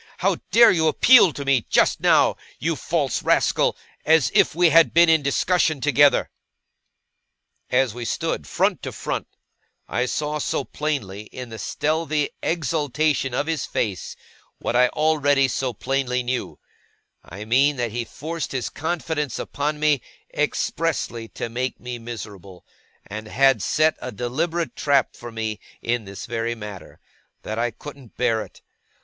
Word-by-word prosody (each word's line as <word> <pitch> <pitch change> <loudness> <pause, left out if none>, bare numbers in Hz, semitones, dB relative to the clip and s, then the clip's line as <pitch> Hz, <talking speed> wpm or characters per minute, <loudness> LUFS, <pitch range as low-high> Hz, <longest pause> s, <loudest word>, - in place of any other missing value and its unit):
How - - +1
dare 235 0 +7
you 160 -2 +2
appeal 210 +4 +6
to 140 -1 -7
me 135 -4 +2
just - - +3
now, - - +4 0.2
you - - -1
false - - -1
rascal, - - +2 0.3
as 160 -3 +4
if - - +3
we 175 0 +5
had 165 -1 +5
been 170 0 +6
in 160 -1 +5
discussion 155 +2 +1
together?' 145 +1 +3 1.4
As 125 -3 +2
we 120 0 -6
stood, 115 - -2
front - - 0
to - - -5
front, - - -4 0.6
I 125 +1 -1
saw 150 +3 -2
so 140 - -1
plainly, 130 -11 -4
in 125 +2 -9
the 110 -1 -8
stealthy 155 -1 -1
exultation 150 -4 0
of 145 - 0
his 160 -3 -2
face, 100 -5 -3 0.4
what - - -3
I 125 +1 +5
already 145 -2 +2
so 130 0 -2
plainly 125 +1 -1
knew; 125 +1 -3 0.7
I 100 +5 -9
mean 135 +6 +3
that 120 -3 -2
he 120 +2 -2
forced 160 +7 -6
his 130 -3 -2
confidence 160 -4 -3
upon 150 +1 -3
me, 150 -3 +2 0.3
expressly 115 -1 -1
to - - -5
make 125 +2 -3
me 125 0 -6
miserable, 100 -5 -9 0.4
and 105 +2 -7
had 135 0 +3
set 155 +7 +2
a 125 - -5
deliberate 155 - -2
trap 140 -3 +1
for 120 0 -9
me 110 -1 -4 0.2
in 120 -2 -2
this 100 0 -8
very 115 0 -2
matter; 105 -4 -10 0.4
that 110 +1 -4
I 120 +1 +1
couldn't 140 +1 -12
bear 115 -3 +1
it. - - -17
135 Hz, 150 wpm, -23 LUFS, 115-155 Hz, 1.4 s, dare